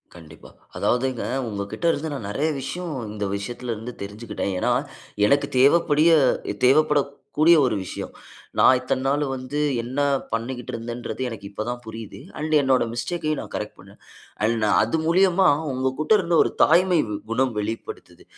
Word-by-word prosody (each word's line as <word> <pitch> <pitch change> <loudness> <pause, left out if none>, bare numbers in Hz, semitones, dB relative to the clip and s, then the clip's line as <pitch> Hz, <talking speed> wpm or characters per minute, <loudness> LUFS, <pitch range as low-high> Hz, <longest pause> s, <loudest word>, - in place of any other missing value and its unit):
கண்டிப்பா. 80 -2 -14 0.3
அதாவதுங்க 125 0 0 0.3
உங்ககிட்ட 100 - -5
இருந்து 160 0 -3
நான் 115 -8 -5
நிறைய 150 +9 0
விஷயம் 175 +4 -5 0.2
இந்த 105 -1 -3
விஷயத்துலருந்து 120 +2 -5
தெரிஞ்சுகிட்டேன். 105 -1 -5
ஏன்னா - - +1 0.6
எனக்கு 140 +5 +2
தேவைப்படிய 155 +3 +4 0.6
தேவைப்படக்கூடிய 150 +3 +3
1 - - -1
விஷயம். - - -7 0.5
நான் 130 - +6
இத்தன 130 - -2
நாள் 145 +2 +1
வந்து 130 +3 -4 0.2
என்ன 125 +4 -4 0.3
பண்ணிக்கிட்டு 120 +2 -4
இருந்தேன்றது 120 +2 -5
எனக்கு 110 -4 -7
இப்ப 105 +1 -5
தான் 120 0 -3
புரியுது. 110 -1 -8 0.2
அண்ட் 155 +1 -2
என்னுடைய 130 -3 +2
மிஸ்டேக்கயும் 155 +4 -2
நான் - - -10
கரெக்ட் - - -5
பண்னேன். - - -16 0.5
அண்ட் 115 0 0 0.2
அது 115 +9 0
மூலியமா 185 +2 +4 0.3
உங்ககிட்ட 130 +7 0
இருந்து 175 -3 0
1 - - -1
தாய்மை 180 0 +4 0.3
குணம் 130 +1 +1
வெளிப்படுத்துது. 110 +2 -6
130 Hz, 135 wpm, -23 LUFS, 115-155 Hz, 0.6 s, நான்